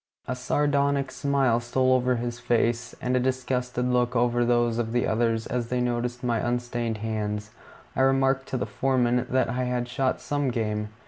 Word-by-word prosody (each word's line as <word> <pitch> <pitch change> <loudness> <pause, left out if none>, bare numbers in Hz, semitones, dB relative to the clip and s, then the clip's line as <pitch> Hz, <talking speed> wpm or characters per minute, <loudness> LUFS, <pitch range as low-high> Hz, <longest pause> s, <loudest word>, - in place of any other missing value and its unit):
A 125 - -2
sardonic 140 +1 +1
smile 135 -4 +1
stole 130 +2 +1
over 125 0 +2
his 120 0 -4
face, 120 0 0
and 125 +1 0
a - - +3
disgusted 125 -1 -1
look 125 -1 +1
over 120 0 +2
those 120 -1 +2
of 115 -1 -2
the 120 - +2
others, 115 0 +1
as 120 -2 -2
they 125 - 0
noticed 125 0 -1
my 120 -2 +1
unstained 120 -1 -2
hands. 105 -1 -3 0.4
I - - +1
remarked 135 0 +2
to 130 - -2
the - - -1
foreman 125 -2 +1
that 130 +1 +2
I 125 +2 -1
had 125 -1 -1
shot 130 +1 0
some 145 -2 -1
game. 105 -3 -2
125 Hz, 180 wpm, -26 LUFS, 120-130 Hz, 0.4 s, a